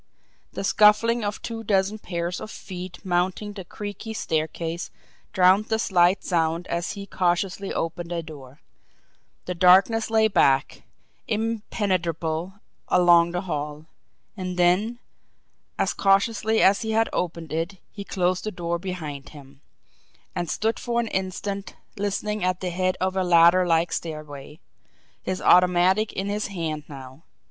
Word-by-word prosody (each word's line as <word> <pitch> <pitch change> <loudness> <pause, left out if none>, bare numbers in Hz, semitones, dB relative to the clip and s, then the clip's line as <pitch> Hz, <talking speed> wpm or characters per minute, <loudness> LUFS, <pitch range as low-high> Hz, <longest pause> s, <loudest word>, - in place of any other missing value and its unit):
The - - -4
scuffling 215 +3 +4
of 205 0 -4
two 225 -1 -5
dozen 200 0 +1
pairs 175 -2 -4
of - - -7
feet 185 -2 -9
mounting 185 +3 -1
the 195 -2 -7
creaky 205 +4 -7
staircase 165 0 -2 0.4
drowned 190 +3 +4
the 220 0 0
slight 185 -3 +3
sound 165 -1 0
as 170 0 -2
he 200 -1 -7
cautiously 185 +1 -1
opened 170 +1 -3
a 170 -1 -2
door; 145 -3 -12 0.8
the 180 - -3
darkness 190 +6 +4
lay 220 -1 +4
black, 135 -8 +2 0.5
impenetrable, 190 -6 -2 0.3
along 175 -1 +5
the 175 +1 -2
hall. 150 -4 -5 0.5
And 185 -2 -5
then, 185 +7 +2 0.8
as - - 0
cautiously 215 +3 +2
as 195 +1 +4
he 220 -1 -2
had 225 +1 +3
opened 165 -3 -3
it, 165 +4 -2
he 200 - -7
closed 185 -2 -1
the 215 - -2
door 170 -2 -3
behind 160 -7 -6
him, 140 -2 -15 0.7
and 175 - -3
stood 220 +2 -1
for 235 -1 -1
an 230 -2 -1
instant 190 +1 -4 0.2
listening 205 0 -2
at 180 0 0
the 180 -1 -3
head 185 +1 0
of 185 0 -1
a 190 - +1
ladder 175 +1 +5
like 165 0 +2
stairway, 150 -2 -6 0.6
his 185 0 -4
automatic 180 +4 +4
in 190 - -3
his 205 +1 -2
hand 160 -6 -4
now. 135 0 -11
180 Hz, 140 wpm, -24 LUFS, 170-205 Hz, 0.8 s, along